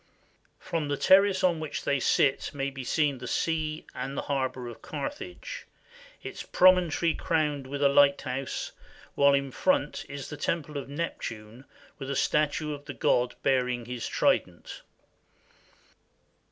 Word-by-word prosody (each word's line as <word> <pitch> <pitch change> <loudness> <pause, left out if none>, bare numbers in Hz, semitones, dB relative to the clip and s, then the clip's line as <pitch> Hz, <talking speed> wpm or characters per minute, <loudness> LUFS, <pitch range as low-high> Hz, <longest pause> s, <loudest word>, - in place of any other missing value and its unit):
From 160 -3 -3
the 145 0 -1
terrace 195 +2 +5
on 175 -3 +3
which 155 -2 -4
they 140 - +1
sit 135 +2 +2
may 140 0 -2
be 135 -1 -7
seen 145 0 +1
the 125 - -7
sea 155 +2 -1
and 135 +2 -5
the - - -2
harbor 130 -3 -2
of 120 - -9
Carthage, 295 - -6 0.6
its - - -6
promontory 180 -3 +4
crowned 150 -4 -1
with 140 +1 -3
a - - +7
lighthouse, 140 -1 +2 0.4
while 140 0 +5
in 140 -1 -1
front 280 - +1
is 140 +1 -7
a 150 - -6
temple 150 0 -2
of 135 - -8
Neptune 120 -6 -5 0.3
with 135 -1 -6
a 140 - -1
statue 150 +2 +1
of 145 0 -9
the - - -7
god 125 0 +2
bearing 125 -2 +1
his 125 0 -4
trident. - - 0
140 Hz, 145 wpm, -28 LUFS, 130-155 Hz, 0.6 s, a